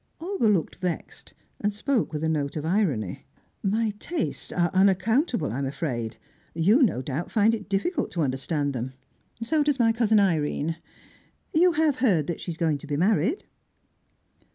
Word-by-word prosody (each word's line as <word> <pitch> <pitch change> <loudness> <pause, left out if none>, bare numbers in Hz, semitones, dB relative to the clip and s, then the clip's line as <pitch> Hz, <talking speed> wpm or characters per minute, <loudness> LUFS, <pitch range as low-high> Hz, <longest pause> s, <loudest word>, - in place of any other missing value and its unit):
Olga 355 - 0
looked 195 -6 +1
vexed, 180 -2 -5 0.2
and 205 - 0
spoke 225 +3 -1
with 150 0 -4
a - - +1
note 145 -3 -1
of 155 -1 -3
irony. 160 - -1 0.3
"My 215 +2 0
tastes 335 -7 -2
are 175 -1 +1
unaccountable, 195 - +2
I'm 135 +4 -2
afraid. 125 -6 -3 0.4
You, 200 - +4
no 160 - +2
doubt, 145 +6 -4
find 220 0 +3
it 210 -3 -5
difficult 275 - 0
to 170 -4 0
understand 140 +2 -1
them. 125 +1 -4 0.5
So 305 +6 +1
does 290 -2 +2
my 230 -3 +4
cousin 225 -2 +3
Irene. 165 -3 0 0.8
You 350 +2 +5
have 310 -3 +2
heard 190 - +2
that 170 +1 -4
she - - -6
is 165 - -4
going 160 -5 +1
to 155 - -11
be 145 -1 -1
married?" 205 - +1
185 Hz, 165 wpm, -26 LUFS, 150-230 Hz, 0.8 s, You